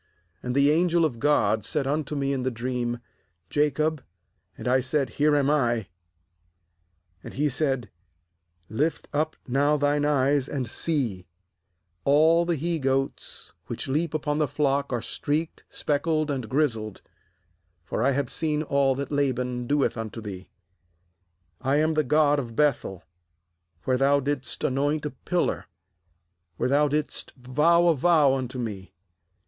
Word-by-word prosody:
nAnd 125 0 -3
the 140 +1 +5
angel 170 +1 +3
of 125 -7 -3
God 110 -6 +2
said 145 +5 -1
unto 150 +1 -1
me 140 -1 0
in 135 - -2
the 130 - 0
dream: 120 0 -3 0.5
Jacob; 150 0 +1 0.5
and - - -6
I 130 +1 +4
said: 135 +2 -1
Here 150 0 +2
am 140 -2 +2
I. 120 -8 +1 1.3
^And - - -9
he 150 +2 +1
said: 135 -3 -1 0.8
Lift 145 - -1
up 155 +2 0
now 140 +4 +2
thine 145 0 +1
eyes, 140 -1 +2
and 130 -4 -3
see, 115 - -2 0.8
all 160 +4 +4
the 170 -1 0
he 165 +2 -2
goats 135 0 -2
which - - -4
leap 155 +4 -1
upon 150 -1 -1
the 150 - +2
flock 140 -1 0
are 120 -2 -2
streaked, 155 +6 -2
speckled, 155 +1 0
and 130 -6 -4
grizzled; 115 -7 -1 0.8
for 100 - -3
I 130 - +3
have 140 -1 0
seen 155 -1 -1
all 140 -3 +2
that 140 +1 -5
Laban 125 -3 -1
doeth 145 -2 +1
unto 115 0 -5
thee. 105 -4 -6 1.2
31.13 - - -26
GENESIS - - -16
"I 135 +2 +2
am 155 +2 +2
the 155 0 +2
God 150 +1 +3
of 130 - -3
^ - - -15
Beth 150 -2 +2
el, 95 -2 -8 0.8
where 130 -1 +1
thou 140 +2 +3
didst 140 -1 -3
anoint 145 +3 0
a 150 - -2
pillar, 175 +6 -2 0.9
where - - 0
thou 145 +2 +4
didst 150 +1 -2
vow 150 +7 +3
a 170 -2 +4
vow 150 -2 +4
unto 130 -1 -3
Me. 105 -7 -6
140 Hz, 155 wpm, -26 LUFS, 125-150 Hz, 1.3 s, the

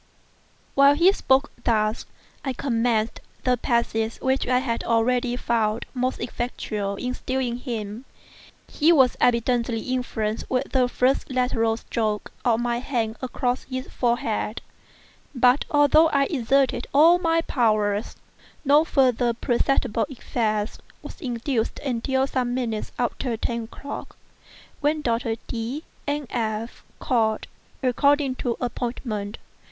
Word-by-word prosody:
While 280 +1 +6
he 345 +5 +6
spoke 275 -7 +2
thus, 215 -2 +1 0.4
I 265 - -2
commenced 230 -3 0 0.2
the 250 -1 +3
passes 230 -2 0
which 265 +1 0
I 250 0 +3
had 245 -3 -1
already 240 +2 +1
found 225 -2 0
most 255 0 -1
effectual 215 -4 -3
in 250 +5 -3
subduing 255 -2 -2
him. 230 -2 -5 0.6
He 315 +3 +3
was 265 -6 +5
evidently 235 -1 +2
influenced 230 -4 -2
with 260 +1 -1
the 255 -2 +3
first 255 +2 +1
lateral 240 -3 +1
stroke 215 -2 -2
of 230 -2 +3
my 240 0 0
hand 230 -4 -2
across 250 0 -2
his 260 -1 -5
forehead; 235 -3 -1 0.7
but 250 +2 +4
although 290 +2 +5
I 280 -3 +2
exerted 265 -3 +1
all 330 +5 +7
my 330 -1 +2
powers, 215 -7 +1 0.5
no 290 +3 +6
further 250 -6 +2
perceptible 235 -2 +1
effect 220 -4 -2 0.2
was - - -10
induced 240 -2 -2
until 265 0 0
some 250 -2 -1
minutes 230 -4 -2
after 245 0 -1
ten 235 0 -2
o'clock, 280 +5 -8 0.6
when 300 +1 0
Doctors 230 -1 0
D—— 240 +6 -4 0.2
and 290 0 -1
F—— 225 -1 -3 0.2
called, 225 -5 +1 0.4
according 280 +2 +3
to 240 -2 -2
appointment. 235 -4 -3
245 Hz, 125 wpm, -24 LUFS, 225-265 Hz, 0.7 s, all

